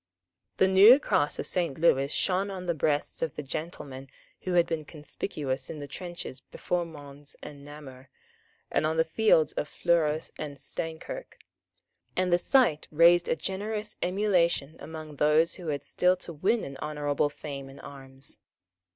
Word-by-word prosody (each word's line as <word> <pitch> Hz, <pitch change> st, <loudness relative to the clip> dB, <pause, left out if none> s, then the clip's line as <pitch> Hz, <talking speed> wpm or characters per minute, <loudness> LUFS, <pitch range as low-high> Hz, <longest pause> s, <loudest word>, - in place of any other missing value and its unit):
The 190 Hz, -, +5 dB
new 200 Hz, +7 st, +9 dB
cross 145 Hz, -, +1 dB
of -, -, -3 dB
Saint 170 Hz, -7 st, -1 dB
Lewis 140 Hz, -4 st, +3 dB
shone 190 Hz, +1 st, 0 dB
on 185 Hz, -2 st, -6 dB
the 175 Hz, -, +1 dB
breasts 150 Hz, -1 st, -1 dB
of 160 Hz, -, -2 dB
the 150 Hz, -, -5 dB
gentlemen 135 Hz, -2 st, -6 dB, 0.3 s
who 185 Hz, -, -3 dB
had 175 Hz, -1 st, +5 dB
been 160 Hz, -2 st, -3 dB
conspicuous 145 Hz, -3 st, -4 dB
in 160 Hz, -, -6 dB
the 145 Hz, -1 st, -7 dB
trenches 175 Hz, -4 st, -7 dB
before 175 Hz, +6 st, -3 dB
Mons 145 Hz, -2 st, -12 dB
and 140 Hz, -1 st, -10 dB
Namur, 140 Hz, -3 st, -11 dB, 0.6 s
and 155 Hz, -, +2 dB
on 160 Hz, +1 st, -1 dB
the 160 Hz, -, +5 dB
fields 160 Hz, -3 st, +3 dB
of -, -, -2 dB
Fleurus 160 Hz, -2 st, +1 dB
and 145 Hz, -2 st, -5 dB
Steinkirk; 160 Hz, -, -6 dB, 0.8 s
and 180 Hz, -1 st, +1 dB
the 175 Hz, -, +5 dB
sight 225 Hz, -, +3 dB
raised 170 Hz, +2 st, +5 dB
a -, -, +2 dB
generous 210 Hz, +5 st, -3 dB
emulation 175 Hz, -6 st, +1 dB
among 155 Hz, -1 st, -8 dB
those 155 Hz, +3 st, +4 dB
who 180 Hz, -3 st, -8 dB
had 145 Hz, -2 st, -2 dB
still 180 Hz, +4 st, +2 dB
to 180 Hz, -1 st, -8 dB
win 195 Hz, +9 st, +1 dB
an 135 Hz, -1 st, -7 dB
honourable 145 Hz, 0 st, -1 dB
fame 140 Hz, -2 st, -7 dB
in 135 Hz, -, -13 dB
arms. 135 Hz, -1 st, -9 dB
155 Hz, 160 wpm, -28 LUFS, 145-180 Hz, 0.8 s, new